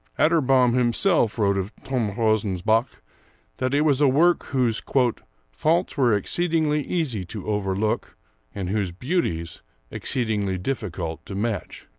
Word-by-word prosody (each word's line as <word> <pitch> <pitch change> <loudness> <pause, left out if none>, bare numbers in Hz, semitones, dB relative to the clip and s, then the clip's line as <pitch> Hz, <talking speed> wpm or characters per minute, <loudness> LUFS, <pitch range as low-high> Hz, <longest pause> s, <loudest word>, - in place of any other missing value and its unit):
Atterbom 135 -6 +4
himself 125 - +2
wrote 100 -3 +2
of 95 +3 -5
'Törnrosens 110 -6 0
Bok' 110 +3 +1 0.5
that 130 +1 0
it 145 - +3
was 150 -2 +2
a 145 - +6
work 165 +6 +3
whose 125 -5 0 0.7
"faults 170 +4 0
were 125 -6 +3
exceedingly 155 - 0
easy 140 - -2
to 100 +2 -7
overlook 105 0 -1 0.4
and 95 -2 -3
whose 100 -4 -1
beauties 85 - -2 0.3
exceedingly 105 -7 -1
difficult 90 -7 -4
to 100 - -6
match." 105 0 -3
115 Hz, 125 wpm, -24 LUFS, 100-140 Hz, 0.7 s, a